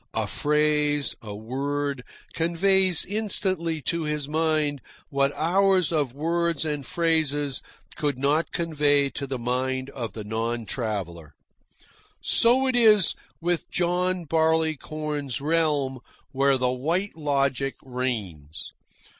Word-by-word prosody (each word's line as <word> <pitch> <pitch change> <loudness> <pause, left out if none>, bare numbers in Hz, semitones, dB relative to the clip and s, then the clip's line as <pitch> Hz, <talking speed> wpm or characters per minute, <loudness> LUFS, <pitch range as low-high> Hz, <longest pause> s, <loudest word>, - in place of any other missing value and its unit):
A - - 0
phrase, 150 -1 +1
a 105 -2 -7
word, 140 +4 -3 0.3
conveys 180 +2 +2
instantly 185 -6 -1
to 170 - -1
his 150 -2 -2
mind 155 -2 0 0.3
what 140 -1 +2
hours 185 +1 +3
of 150 -6 +1
words 170 +1 0
and 150 -2 -2
phrases 155 -5 0 0.3
could 145 -3 -1
not 145 +5 +1
convey 145 -4 +2
to 140 - -5
the 135 -1 -3
mind 130 +2 -2
of 120 -5 -5
the 110 - -6
non 115 +2 -2
traveller. 95 - -4 0.8
So 250 +3 +3
it 260 -1 +1
is 215 -7 +6 0.3
with 175 0 -1
John 180 0 0
Barleycorn's 155 -3 0
realm 145 -3 +1 0.3
where 135 0 +3
the 125 -1 +1
White 165 +10 -1
Logic 140 -3 0
reigns. 105 - -4
145 Hz, 115 wpm, -25 LUFS, 130-165 Hz, 0.8 s, is